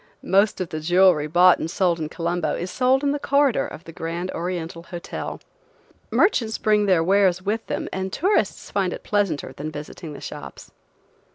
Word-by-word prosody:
Most 200 +3 +3
of 185 -3 -3
the 155 - -4
jewelry 175 -1 +4
bought 175 +3 +5
and 160 - -3
sold 175 -1 +1
in 155 -1 -3
Colombo 170 +1 -2
is 180 +1 -4
sold 260 +2 +2
in 285 - +2
the 290 - -1
corridor 280 -3 +2
of 165 - -10
the 165 - -10
Grand 170 +3 -4
Oriental 170 -1 -4
Hotel. 170 0 -6 0.7
Merchants 230 - +2
bring 210 -1 +2
their 180 -4 +4
wares 185 0 +3
with 215 +3 -2
them - - -3
and 190 0 -3
tourists 385 - 0
find 190 -3 0
it - - -8
pleasanter 200 -8 -1
than 150 +2 -5
visiting 150 +1 -8
the - - -9
shops. - - -9
180 Hz, 180 wpm, -23 LUFS, 165-205 Hz, 0.7 s, bought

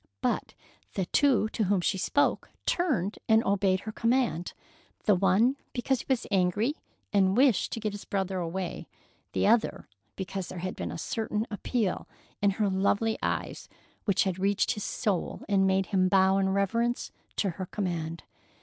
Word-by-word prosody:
But - - -1 0.4
the 190 - 0
two 265 +1 +3
to 220 -1 -1
whom 195 0 +2
she 190 +2 0
spoke 285 +9 +1 0.2
turned 250 - 0
and 220 +1 +5
obeyed 195 -1 +2
her 220 - -5
command, 230 -7 0 0.5
the 210 - +5
one 200 +8 +3 0.2
because 260 +1 0
he - - -7
was 260 -3 +1
angry 195 +7 +2 0.4
and 195 0 +3
wished 255 -7 +4
to - - -3
get 215 -1 -2
his 205 - -7
brother 190 -1 -2
away, 175 +1 -4 0.5
the - - +1
other 225 +2 +2 0.3
because 190 -1 -4
there - - -7
had 185 +2 -4
been 85 -2 -4
a 85 - -5
certain 220 - -2
appeal 215 0 -1 0.3
in 200 - +4
her 210 -2 +2
lovely 200 +3 +1
eyes - - -3 0.4
which 200 -4 +3
had 190 -2 -2
reached 200 +1 +2
his 210 -4 -3
soul 200 -5 -2
and 195 -2 +3
made 190 0 +2
him 185 -1 +4
bow 190 +1 +4
in 190 0 +2
reverence 230 +5 0 0.2
to 195 - 0
her 185 +2 -6
command. 170 -5 -3
200 Hz, 170 wpm, -28 LUFS, 185-220 Hz, 0.5 s, and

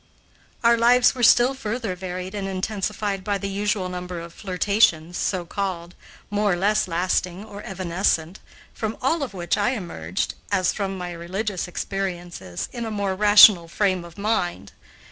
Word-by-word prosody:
Our 235 0 +5
lives 245 +1 +5
were 255 - -6
still 240 +2 +6
further 230 -5 -3
varied 185 +1 -6
and 200 -2 -3
intensified 195 +1 -2
by 205 0 0
the 200 - -4
usual 200 -1 -1
number 180 -1 -5
of 170 0 -9
flirtations, 180 -4 +1
so 180 -1 -1
called, 180 -2 -4 0.4
more 205 -1 +2
or - - +1
less 200 +3 +1
lasting 180 +2 -1
or 205 -1 -9
evanescent, 180 -1 -1 0.3
from 220 0 -4
all 305 +6 +1
of 250 -8 -4
which 175 +2 -1
I 245 +6 +1
emerged, 90 - -3 0.2
as 185 -3 +2
from 195 -2 -3
my 180 -1 -5
religious 185 +3 -3
experiences, 175 - -4
in 240 - -5
a - - -3
more 200 -3 -1
rational 205 -3 +7
frame 185 0 0
of 170 -1 -13
mind. 200 -4 -1
195 Hz, 160 wpm, -23 LUFS, 175-210 Hz, 0.4 s, rational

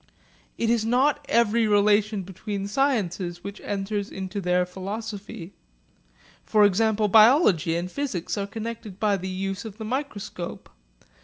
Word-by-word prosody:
It 230 0 +1
is 235 -2 +2
not 270 +6 +2
every 230 0 +3
relation 205 0 +3
between 195 +2 -5
sciences 195 -8 -1
which 200 +1 -7
enters 205 0 -3
into 190 +1 -5
their 180 0 +2
philosophy. 200 0 -7 0.9
For 210 -1 +4
example 215 +2 +2
biology 215 - +5
and 170 +1 -1
physics 260 -12 -3
are 200 -1 -3
connected 220 -2 -7
by 205 -2 +2
the 190 0 -5
use 195 +1 -3
of 215 -2 -9
the 220 - -6
microscope. 215 -8 -5
205 Hz, 135 wpm, -25 LUFS, 190-225 Hz, 0.9 s, biology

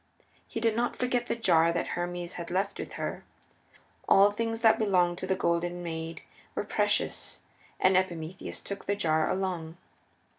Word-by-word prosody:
He - - -4
did 225 -1 +2
not 240 +1 0
forget 250 -1 0
the - - 0
jar 170 -7 +4
that 170 - -1
Hermes 175 0 -3
had 170 -1 -6
left 190 +3 -1
with - - -6
her. - - -4 0.9
All 200 +1 +7
things 225 +2 -2
that 225 -1 +5
belonged 180 -5 +2
to 185 - -4
the 190 - +2
Golden 175 0 0
Maid 165 -1 -5 0.3
were - - -1
precious, - - 0 0.4
and 185 0 +4
Epimetheus 175 -2 -2
took 200 0 -5
the 200 - +1
jar 160 -5 +1
along. 175 -4 -2
185 Hz, 160 wpm, -29 LUFS, 170-205 Hz, 0.9 s, All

